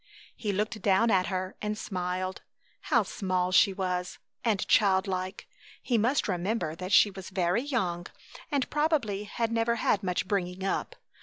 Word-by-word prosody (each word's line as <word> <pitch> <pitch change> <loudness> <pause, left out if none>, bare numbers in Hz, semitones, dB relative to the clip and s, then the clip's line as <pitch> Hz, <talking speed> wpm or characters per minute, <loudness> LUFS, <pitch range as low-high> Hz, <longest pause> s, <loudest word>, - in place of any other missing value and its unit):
He 215 -3 -2
looked 215 +2 -2
down 200 +4 +3
at 185 -2 +3
her 185 -1 -3
and 210 0 -2
smiled. 185 -1 -3 0.5
How - - +4
small 185 -4 -1
she 190 +3 +6
was, 180 -2 -3 0.3
and 215 -5 +1
child 190 -3 +4
like. 185 0 -4 0.3
He 245 - -1
must 235 +6 +2
remember 185 -2 -1
that 185 +3 -6
she 205 +1 +6
was 190 -1 -9
very 185 +2 +1
young, 185 -11 -2 0.4
and 280 -3 +1
probably 285 -10 0
had 225 +2 -2
never 230 0 +1
had 210 -3 +1
much 185 -1 -1
bringing 190 -2 -2
up. 195 - -2
195 Hz, 160 wpm, -29 LUFS, 185-220 Hz, 0.5 s, she